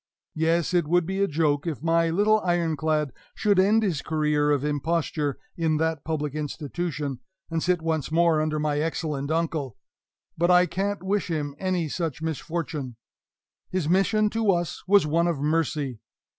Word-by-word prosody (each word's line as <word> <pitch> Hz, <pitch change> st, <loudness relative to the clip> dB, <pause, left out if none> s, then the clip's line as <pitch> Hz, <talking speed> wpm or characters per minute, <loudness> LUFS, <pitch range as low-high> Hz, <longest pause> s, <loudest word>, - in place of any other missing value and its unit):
Yes, 165 Hz, +2 st, +1 dB
it 175 Hz, -4 st, +2 dB
would 175 Hz, +1 st, +3 dB
be 190 Hz, +3 st, -2 dB
a 200 Hz, -, +3 dB
joke 150 Hz, -1 st, 0 dB
if 155 Hz, -3 st, -4 dB
my 165 Hz, 0 st, +3 dB
little 210 Hz, +5 st, +3 dB
Iron 175 Hz, -4 st, 0 dB
clad 150 Hz, -2 st, 0 dB, 0.2 s
should 205 Hz, -3 st, +2 dB
end 210 Hz, +4 st, +4 dB
his 175 Hz, -9 st, 0 dB
career 150 Hz, -2 st, +1 dB
of 145 Hz, -1 st, +1 dB
imposture 150 Hz, -1 st, -1 dB, 0.2 s
in 160 Hz, -4 st, +1 dB
that 160 Hz, -2 st, -1 dB
public 150 Hz, -3 st, -2 dB
institution, 150 Hz, -1 st, -4 dB, 0.3 s
and 165 Hz, -1 st, 0 dB
sit 180 Hz, -1 st, +1 dB
once 160 Hz, -3 st, -1 dB
more 165 Hz, -1 st, +3 dB
under 155 Hz, 0 st, -1 dB
my 150 Hz, -1 st, 0 dB
excellent 150 Hz, -3 st, -2 dB
uncle! 155 Hz, -7 st, -1 dB, 0.6 s
But 175 Hz, +2 st, +1 dB
I 180 Hz, 0 st, +6 dB
can't 195 Hz, +2 st, -2 dB
wish 200 Hz, +2 st, 0 dB
him 150 Hz, -3 st, -2 dB
any 185 Hz, -3 st, 0 dB
such 160 Hz, -2 st, -3 dB
misfortune. 160 Hz, -4 st, -4 dB, 0.7 s
His 185 Hz, -5 st, -1 dB
mission 205 Hz, +4 st, +2 dB
to 225 Hz, -3 st, +2 dB
us 175 Hz, -2 st, -2 dB
was 200 Hz, -3 st, +5 dB
one 165 Hz, +3 st, +2 dB
of 165 Hz, -5 st, -1 dB
mercy. 150 Hz, -4 st, -1 dB
160 Hz, 165 wpm, -25 LUFS, 150-175 Hz, 0.7 s, I